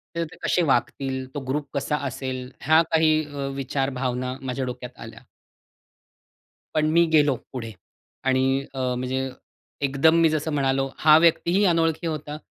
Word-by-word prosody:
तर 170 - 0
ते - - -13
कसे 180 - +2
वागतील? 130 0 0
तो 145 - -3
ग्रुप 145 +2 -2
कसा 145 +1 -1
असेल? 130 0 -5
ह्या 160 +3 +5
काही 155 -1 +3
अ, 140 -1 -5
विचार, 135 0 -1
भावना 130 0 -2
माझ्या 130 0 -3
डोक्यात 125 0 -7
आल्या. - - -10 1.5
पण 155 0 +2
मी 170 +1 +5
गेलो 145 -3 +5 0.2
पुढे 115 -3 -5 0.5
आणि 130 0 +2 0.3
अ, 135 - -6 0.2
म्हणजे 130 +1 -2 0.6
एकदम 140 +4 +3
मी 165 - +5
जसं 155 0 -1
म्हणालो, 135 -1 +1
हा 155 0 +6
व्यक्तीही 170 +4 +3
अनोळखी 165 -1 +1
होता. 150 -1 -4
140 Hz, 150 wpm, -24 LUFS, 130-155 Hz, 1.5 s, हा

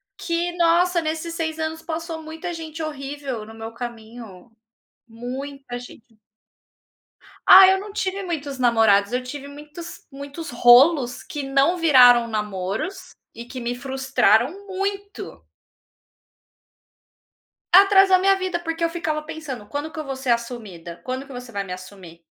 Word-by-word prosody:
que, 345 0 -2
nossa, 345 +1 +3
nesses 320 +1 -4
6 320 -1 -3
anos 320 0 -4
passou 325 0 -5
muita 320 +3 -7
gente 320 -1 -7
horrível 275 -5 -5
no 220 +1 -12
meu 225 0 -8
caminho, 230 -3 -9 0.6
muita 255 +2 -7
gente. 240 -2 -14 1.3
Ah, 380 0 +10
eu 380 0 +3
não 410 +1 -8
tive 390 -1 -3
muitos 295 -6 -4
namorados, 225 -5 +3
eu 250 +1 -1
tive 280 +2 -8
muitos 300 +4 -11
muitos 280 +4 -8
rolos 245 +2 +5
que 290 - -6
não 275 +5 +2
viraram 250 -7 +6
namoros 215 - -4 0.3
e 230 - -8
que 255 +1 -8
me 240 0 -3
frustraram 265 - +1
muito. 400 +1 -5 2.3
Atrasou 390 -1 +7
a - - -3
minha 390 +1 +4
vida, 370 -2 -3
porque 330 -1 -4
eu 335 - +2
ficava 310 -2 -2
pensando: 300 -8 -7
"Quando 290 +7 -5
que 315 - -8
eu 310 - -5
vou 270 -1 -4
ser 265 -1 -5
assumida, 215 -8 -4
quando 260 +1 -4
que 275 - -12
você 245 -1 -9
vai 200 -3 -3
me 185 -2 -7
assumir?". 185 -2 -12
280 Hz, 145 wpm, -22 LUFS, 240-335 Hz, 2.3 s, Ah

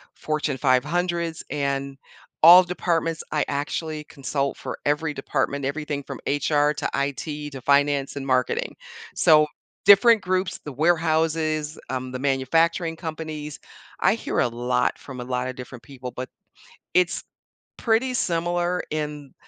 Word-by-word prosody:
Fortune 155 -3 -2
500s 165 +6 0
and 140 -1 -2 0.5
all 175 +3 +10
departments, 165 -2 -1
I 150 - +1
actually 150 +2 -3
consult 140 0 -3
for - - -6
every 150 +1 0
department, 140 0 -2
everything 145 0 -3
from - - -8
HR 145 +1 +2
to - - -2
IT 145 +2 -3
to 135 - -8
finance 140 +1 +2
and 140 -1 -5
marketing, 130 - 0 0.4
so 150 -3 +5 0.4
different 215 +3 +7
groups, 185 0 -1
the 150 - -5
warehouses, 160 0 +1
um, 130 -1 -3
the 130 - -5
manufacturing 165 +5 +1
companies. 155 -3 -6 0.4
I - - +4
hear - - -3
a - - +3
lot 125 +1 0
from 130 -3 -9
a - - -4
lotta 125 +1 -2
different 125 -1 -10
people, 125 -1 -8
but 130 0 -6 0.6
it's 180 -2 +2 0.5
pretty 240 +3 +1
similar 175 -1 0
in 150 -2 -4
150 Hz, 130 wpm, -24 LUFS, 135-165 Hz, 0.6 s, all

